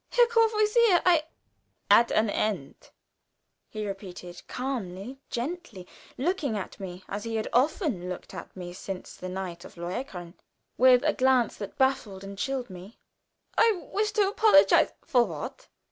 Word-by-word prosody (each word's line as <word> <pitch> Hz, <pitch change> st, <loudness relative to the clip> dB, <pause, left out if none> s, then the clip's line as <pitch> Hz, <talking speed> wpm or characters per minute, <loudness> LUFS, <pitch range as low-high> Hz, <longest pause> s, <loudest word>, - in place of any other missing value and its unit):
"Herr 485 Hz, -1 st, +5 dB
Courvoisier, 450 Hz, -3 st, +4 dB
I 340 Hz, -4 st, +4 dB, 0.3 s
" -, -, -10 dB
"At 235 Hz, -, -4 dB
an 220 Hz, +1 st, +2 dB
end," 205 Hz, -8 st, -3 dB, 0.8 s
he 215 Hz, -1 st, -5 dB
repeated, 180 Hz, -3 st, -8 dB
calmly, 245 Hz, -2 st, -5 dB
gently, 250 Hz, -, -5 dB, 0.3 s
looking 285 Hz, -, -1 dB
at 195 Hz, -, -7 dB
me 185 Hz, -1 st, -7 dB
as 205 Hz, +1 st, -5 dB
he 230 Hz, -1 st, -4 dB
had 220 Hz, -, -1 dB
often 250 Hz, -, +1 dB
looked 180 Hz, -, -7 dB
at -, -, -9 dB
me 175 Hz, -1 st, -7 dB
since 190 Hz, 0 st, -7 dB
the 185 Hz, -, -7 dB
night 180 Hz, -2 st, -5 dB
of -, -, -13 dB
"Lohengrin," 175 Hz, -1 st, -5 dB, 0.4 s
with 250 Hz, 0 st, +6 dB
a -, -, +2 dB
glance 255 Hz, -3 st, +2 dB
that 205 Hz, -2 st, -7 dB
baffled 250 Hz, -8 st, 0 dB
and 195 Hz, 0 st, -8 dB
chilled 255 Hz, +1 st, -3 dB
me. 185 Hz, +5 st, -11 dB, 0.6 s
"I 455 Hz, 0 st, +5 dB, 0.2 s
wish 420 Hz, +1 st, 0 dB
to 420 Hz, -3 st, +3 dB
apologize 410 Hz, -6 st, +5 dB
" -, -, -31 dB
"For 255 Hz, -7 st, +4 dB
what?" 165 Hz, -9 st, -7 dB
230 Hz, 155 wpm, -27 LUFS, 185-300 Hz, 0.8 s, with